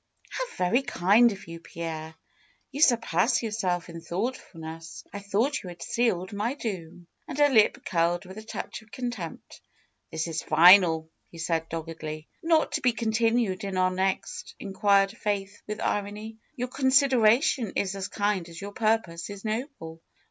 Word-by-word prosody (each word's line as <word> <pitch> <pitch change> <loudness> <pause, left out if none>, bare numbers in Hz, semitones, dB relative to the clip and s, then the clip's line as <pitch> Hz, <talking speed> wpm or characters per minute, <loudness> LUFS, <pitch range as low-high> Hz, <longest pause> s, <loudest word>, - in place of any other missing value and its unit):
^^How - - -4
very 200 +9 +2
kind 230 0 +4
of 195 -4 -9
you, 165 0 -8
Pierre! 160 -1 -6 0.6
You 280 +2 -4
surpass 235 - +3
your 225 - -2
self 180 -5 -1
in 165 -1 -8
thoughtfulness. 165 -4 -5
I 200 - -4
thought 220 +9 0
you 185 - -8
had 175 -1 -9
sealed 200 -6 0
my 220 +6 -1
doom," 180 - -6 0.2
and 285 - -6
her 290 0 +5
lip 220 -6 +3
curled 170 +1 +1
with 190 +3 -9
a - - -10
touch 220 - -6
of 220 - -21
contempt. 220 -7 -6 0.5
'^This 160 +1 -2
is 165 0 -3
final," 170 -3 +6 0.2
he 170 - -13
said, 165 0 -1
doggedly. 160 -1 -6 0.2
^^Not 325 -1 +3
to 305 - -1
be 250 -3 +3
continued 225 -3 +1
in 195 -2 -3
our 185 0 +3
next?" 190 +1 -2
inquired 195 0 +2
Faith 205 -2 -3
with 210 0 -4
irony. 210 +2 -3 0.2
^^Your 250 0 -2
consideration 260 -3 +3
is 195 0 0
as 195 0 -3
kind 205 -4 -1
as 170 0 -9
your 200 +1 -6
purpose 215 -7 0
is 200 +1 -9
noble." 215 - -4
200 Hz, 165 wpm, -27 LUFS, 170-230 Hz, 0.6 s, final